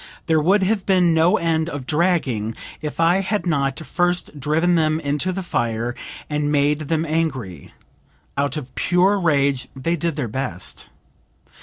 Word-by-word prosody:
There 160 Hz, -2 st, +3 dB
would 190 Hz, +5 st, +3 dB
have 200 Hz, 0 st, 0 dB
been 180 Hz, -3 st, +4 dB
no 160 Hz, +2 st, +4 dB
end 165 Hz, -1 st, 0 dB
of 145 Hz, -5 st, -6 dB
dragging 140 Hz, -, 0 dB, 0.3 s
if 150 Hz, +1 st, -5 dB
I 165 Hz, +2 st, +4 dB
had 200 Hz, +1 st, -1 dB
not 140 Hz, -5 st, 0 dB
first 175 Hz, -2 st, -1 dB
driven 160 Hz, +6 st, +2 dB
them 155 Hz, -2 st, +2 dB
into 145 Hz, +5 st, -1 dB
the 190 Hz, +1 st, -4 dB
fire 120 Hz, -6 st, -1 dB, 0.3 s
and 150 Hz, 0 st, -1 dB
made 145 Hz, +1 st, +1 dB
them 160 Hz, +1 st, 0 dB
angry. 135 Hz, -, -3 dB, 0.6 s
Out 140 Hz, +1 st, -1 dB
of 130 Hz, -4 st, -7 dB
pure 185 Hz, +7 st, +2 dB
rage 140 Hz, -6 st, +1 dB
they 165 Hz, +6 st, -1 dB
did 170 Hz, -1 st, -2 dB
their 140 Hz, -5 st, -2 dB
best." 110 Hz, -6 st, -4 dB
155 Hz, 155 wpm, -21 LUFS, 140-175 Hz, 0.6 s, been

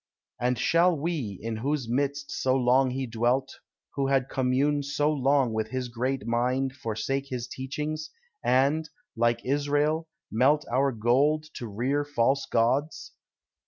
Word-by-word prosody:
And 125 Hz, +1 st, +1 dB
shall 170 Hz, +7 st, +3 dB
we, 145 Hz, -, -3 dB
in 115 Hz, -1 st, -3 dB
whose 135 Hz, +2 st, -1 dB
midst 140 Hz, +3 st, -1 dB
so 130 Hz, 0 st, +1 dB
long 130 Hz, +1 st, +3 dB
he 130 Hz, +1 st, -2 dB
dwelt, 120 Hz, +3 st, -1 dB, 0.3 s
Who 140 Hz, -1 st, 0 dB
had 135 Hz, -1 st, +1 dB
commune 135 Hz, +3 st, +1 dB
so 145 Hz, +2 st, 0 dB
long 135 Hz, -4 st, +2 dB
with 110 Hz, 0 st, -1 dB
his 130 Hz, 0 st, -3 dB
great 125 Hz, +1 st, -2 dB
mind, 125 Hz, +3 st, 0 dB
Forsake 135 Hz, +2 st, -3 dB
his 125 Hz, -2 st, -4 dB
teachings, 150 Hz, +4 st, -4 dB, 0.3 s
and, 140 Hz, +5 st, +2 dB, 0.3 s
like 120 Hz, 0 st, +1 dB
Israel, 145 Hz, +3 st, +1 dB, 0.2 s
melt 135 Hz, +7 st, +3 dB
Our 135 Hz, +2 st, +2 dB
gold 130 Hz, +7 st, +2 dB
to 120 Hz, -, -6 dB
rear 125 Hz, +8 st, -1 dB
false 135 Hz, -1 st, +1 dB
gods! 130 Hz, +7 st, 0 dB
135 Hz, 140 wpm, -27 LUFS, 120-145 Hz, 0.3 s, shall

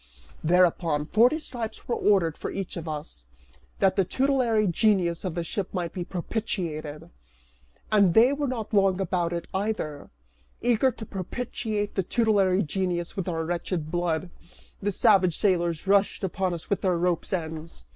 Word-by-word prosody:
Thereupon, 170 Hz, -3 st, +3 dB
forty 240 Hz, -, +4 dB
stripes 235 Hz, -8 st, -6 dB
were 240 Hz, -, 0 dB
ordered 185 Hz, -9 st, +2 dB
for -, -, -5 dB
each 195 Hz, -2 st, -5 dB
of 170 Hz, -1 st, -6 dB
us, 150 Hz, -, -6 dB, 0.5 s
that 190 Hz, -1 st, +3 dB
the 195 Hz, -, +3 dB
tutelary 250 Hz, -1 st, +2 dB
genius 180 Hz, -2 st, +2 dB
of 180 Hz, -4 st, -3 dB
the 170 Hz, -, -1 dB
ship 190 Hz, +3 st, -3 dB
might 175 Hz, -2 st, -2 dB
be 180 Hz, -, -3 dB
propitiated. 170 Hz, -5 st, -4 dB, 0.8 s
And 200 Hz, -5 st, +4 dB
they 240 Hz, +5 st, +6 dB
were 285 Hz, 0 st, -1 dB
not 230 Hz, -4 st, -4 dB
long 195 Hz, -2 st, +3 dB
about 175 Hz, -2 st, 0 dB
it 170 Hz, -1 st, -4 dB
either. 190 Hz, -7 st, -3 dB, 0.5 s
Eager 240 Hz, +2 st, +3 dB
to 220 Hz, -1 st, -9 dB
propitiate 210 Hz, +1 st, -3 dB
the 190 Hz, -, +1 dB
tutelary 200 Hz, -2 st, +2 dB
genius 175 Hz, 0 st, -2 dB
with 190 Hz, -2 st, -3 dB
our 165 Hz, -1 st, -2 dB
wretched 170 Hz, -2 st, -3 dB
blood, 175 Hz, 0 st, -1 dB, 0.5 s
the 205 Hz, +1 st, 0 dB
savage 190 Hz, -5 st, +4 dB
sailors 175 Hz, -5 st, +1 dB
rushed 200 Hz, +1 st, +2 dB
upon 190 Hz, -1 st, -1 dB
us 165 Hz, -, -9 dB
with 200 Hz, -, -1 dB
their 185 Hz, -3 st, +1 dB
rope's 175 Hz, 0 st, 0 dB
ends. 160 Hz, -, -4 dB
185 Hz, 155 wpm, -26 LUFS, 170-210 Hz, 0.8 s, they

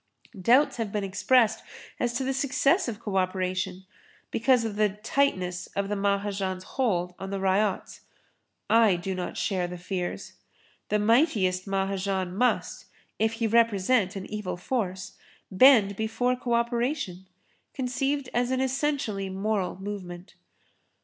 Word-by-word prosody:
Doubts 250 Hz, +10 st, +4 dB
have 225 Hz, -3 st, -3 dB
been 210 Hz, -1 st, -2 dB
expressed 220 Hz, +3 st, +2 dB, 0.4 s
as 240 Hz, -1 st, 0 dB
to 255 Hz, +2 st, -1 dB
the 265 Hz, +1 st, -1 dB
success 280 Hz, +6 st, +2 dB
of 225 Hz, -3 st, -4 dB
co 205 Hz, -4 st, -3 dB
operation 185 Hz, 0 st, -1 dB, 0.5 s
because 240 Hz, 0 st, +3 dB
of 215 Hz, -2 st, -3 dB
the 210 Hz, 0 st, +3 dB
tightness 190 Hz, -4 st, -1 dB
of 200 Hz, 0 st, -1 dB
the 205 Hz, -, -1 dB
Mahajan's 200 Hz, -2 st, -1 dB
hold 180 Hz, -10 st, -1 dB
on 195 Hz, -, -6 dB
the 195 Hz, 0 st, -3 dB
ryots. 195 Hz, +1 st, 0 dB, 0.7 s
I 225 Hz, -4 st, +5 dB
do 180 Hz, +2 st, -4 dB
not 180 Hz, -1 st, -5 dB
share 185 Hz, -3 st, -1 dB
the 180 Hz, 0 st, -7 dB
fears. 180 Hz, 0 st, -4 dB, 0.6 s
The 210 Hz, -, +2 dB
mightiest 210 Hz, -, +2 dB
Mahajan 195 Hz, -1 st, -1 dB
must, 250 Hz, +4 st, 0 dB, 0.3 s
if 220 Hz, +1 st, +2 dB
he 225 Hz, 0 st, -2 dB
represent 220 Hz, -2 st, +2 dB
an 195 Hz, -1 st, -5 dB
evil 210 Hz, -4 st, -5 dB
force, 190 Hz, -3 st, -3 dB, 0.3 s
bend 205 Hz, -1 st, +6 dB
before 225 Hz, +4 st, 0 dB
co 245 Hz, -1 st, -1 dB
operation, 235 Hz, -, -1 dB, 0.5 s
conceived 270 Hz, +1 st, -1 dB
as 245 Hz, 0 st, +1 dB
an 260 Hz, 0 st, 0 dB
essentially 265 Hz, -7 st, -1 dB
moral 190 Hz, -1 st, -2 dB
movement. 190 Hz, -3 st, -7 dB
205 Hz, 135 wpm, -27 LUFS, 190-240 Hz, 0.7 s, bend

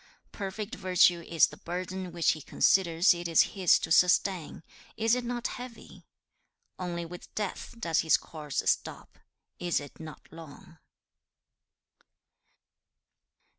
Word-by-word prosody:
'Perfect 205 Hz, +3 st, -6 dB
virtue 180 Hz, -3 st, +3 dB
is 165 Hz, -1 st, +3 dB
the 150 Hz, 0 st, -10 dB
burden 185 Hz, +2 st, -5 dB
which 170 Hz, -1 st, +2 dB
he 155 Hz, -, -5 dB
considers 175 Hz, +3 st, +3 dB
it 175 Hz, 0 st, -5 dB
is 165 Hz, -2 st, +5 dB
his 185 Hz, -4 st, +4 dB
to -, -, -5 dB
sustain; 180 Hz, -1 st, +2 dB, 0.3 s
is 225 Hz, 0 st, +2 dB
it 250 Hz, 0 st, +1 dB
not 240 Hz, 0 st, -4 dB
heavy? 250 Hz, -2 st, -8 dB, 0.7 s
Only 175 Hz, -2 st, -4 dB
with 175 Hz, +1 st, -11 dB
death 210 Hz, +2 st, -4 dB
does 165 Hz, -8 st, 0 dB
his 160 Hz, -, +4 dB
course 150 Hz, -3 st, -5 dB
stop; -, -, -2 dB, 0.4 s
is 175 Hz, -1 st, 0 dB
it 145 Hz, -1 st, -12 dB
not 160 Hz, -1 st, -10 dB
long? 160 Hz, 0 st, -13 dB
175 Hz, 125 wpm, -29 LUFS, 165-195 Hz, 0.7 s, is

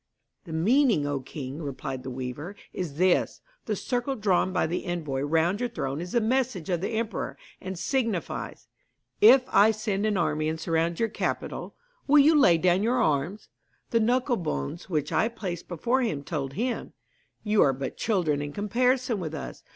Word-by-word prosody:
'The 165 Hz, -, -7 dB
meaning, 220 Hz, -, +3 dB
O 145 Hz, -1 st, -1 dB
king,' 135 Hz, +2 st, -7 dB
replied 135 Hz, -2 st, -5 dB
the 130 Hz, -, -6 dB
weaver, 130 Hz, +9 st, -6 dB, 0.2 s
'is 165 Hz, -6 st, -4 dB
this: 180 Hz, +3 st, +2 dB, 0.3 s
The 215 Hz, -, 0 dB
circle 245 Hz, +6 st, -2 dB
drawn 190 Hz, -4 st, +1 dB
by -, -, +1 dB
the 170 Hz, +3 st, -3 dB
envoy 155 Hz, -6 st, -2 dB
round 165 Hz, +7 st, +1 dB
your 245 Hz, 0 st, -1 dB
throne 135 Hz, -, -3 dB
is 180 Hz, +1 st, -7 dB
the 240 Hz, -, +4 dB
message 230 Hz, -6 st, 0 dB
of 175 Hz, -2 st, 0 dB
the 210 Hz, -, -2 dB
emperor, 225 Hz, -3 st, -3 dB, 0.2 s
and 190 Hz, 0 st, -5 dB
signifies, 230 Hz, -4 st, -2 dB, 0.5 s
"If 275 Hz, -11 st, +8 dB
I 210 Hz, +2 st, +6 dB
send 215 Hz, -1 st, -1 dB
an 210 Hz, -2 st, +1 dB
army 155 Hz, -3 st, 0 dB
and 160 Hz, 0 st, -3 dB
surround 165 Hz, +1 st, 0 dB
your 230 Hz, -, +1 dB
capital, -, -, -3 dB, 0.3 s
will 295 Hz, +2 st, +6 dB
you 295 Hz, +3 st, +7 dB
lay 260 Hz, -, +6 dB
down 180 Hz, +2 st, +3 dB
your 240 Hz, +4 st, +1 dB
arms?" 160 Hz, +2 st, 0 dB, 0.4 s
The 230 Hz, -, +3 dB
knuckle 245 Hz, +2 st, +2 dB
bones 160 Hz, -, -4 dB
which 150 Hz, -4 st, -1 dB
I 220 Hz, -, +2 dB
placed 185 Hz, -7 st, -5 dB
before 235 Hz, +10 st, 0 dB
him 155 Hz, -, -1 dB
told 140 Hz, -4 st, -4 dB
him, 240 Hz, -, -3 dB, 0.5 s
"You 210 Hz, -1 st, +3 dB
are 135 Hz, -, +5 dB
but 135 Hz, 0 st, -5 dB
children 170 Hz, -10 st, 0 dB
in 145 Hz, 0 st, -5 dB
comparison 245 Hz, -, +1 dB
with 160 Hz, -3 st, -4 dB
us. 145 Hz, -, -7 dB
180 Hz, 180 wpm, -27 LUFS, 155-230 Hz, 0.5 s, If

